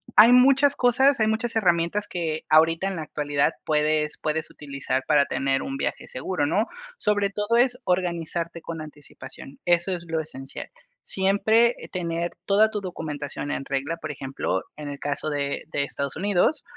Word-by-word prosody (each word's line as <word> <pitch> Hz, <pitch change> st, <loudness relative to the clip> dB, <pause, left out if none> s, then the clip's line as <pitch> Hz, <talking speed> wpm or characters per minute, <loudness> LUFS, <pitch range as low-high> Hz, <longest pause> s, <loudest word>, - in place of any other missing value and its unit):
hay 225 Hz, +3 st, +9 dB
muchas 275 Hz, +3 st, +6 dB
cosas, 260 Hz, +3 st, +4 dB
hay 220 Hz, -, +3 dB
muchas 225 Hz, +1 st, -1 dB
herramientas 175 Hz, -1 st, +1 dB
que 160 Hz, -3 st, -3 dB
ahorita 165 Hz, +4 st, +4 dB
en 195 Hz, -, -2 dB
la 160 Hz, -, -4 dB
actualidad 145 Hz, -1 st, 0 dB
puedes 150 Hz, 0 st, +1 dB
puedes 155 Hz, +1 st, -2 dB
utilizar 140 Hz, -2 st, -3 dB
para 145 Hz, -2 st, +4 dB
tener 135 Hz, -1 st, 0 dB
un 135 Hz, -, -4 dB
viaje -, -, -3 dB
seguro, 145 Hz, +4 st, -2 dB
¿no? 205 Hz, +8 st, +2 dB, 0.3 s
Sobre 205 Hz, -, +1 dB
todo 210 Hz, +3 st, 0 dB
es 250 Hz, +1 st, +3 dB
organizarte 170 Hz, -2 st, -2 dB
con 165 Hz, -1 st, -6 dB
anticipación, 150 Hz, -2 st, -11 dB
eso 175 Hz, +2 st, +3 dB
es 170 Hz, -1 st, -8 dB
lo 165 Hz, -1 st, -1 dB
esencial. 135 Hz, -3 st, -7 dB, 0.3 s
Siempre, 220 Hz, +5 st, +3 dB
eh, -, -, -10 dB
tener 170 Hz, -1 st, -2 dB
toda 210 Hz, +2 st, +4 dB
tu 210 Hz, -, -3 dB
documentación 150 Hz, -5 st, -5 dB
en -, -, -2 dB
regla, 140 Hz, +4 st, -2 dB
por 155 Hz, -2 st, -5 dB
ejemplo, 135 Hz, -8 st, -3 dB, 0.2 s
en 150 Hz, -1 st, -6 dB
el 140 Hz, -1 st, -7 dB
caso 145 Hz, +1 st, -2 dB
de 140 Hz, -1 st, -2 dB
de 140 Hz, -, 0 dB
Estados 140 Hz, 0 st, -4 dB
Unidos, 205 Hz, -, +1 dB
165 Hz, 170 wpm, -25 LUFS, 145-205 Hz, 0.3 s, hay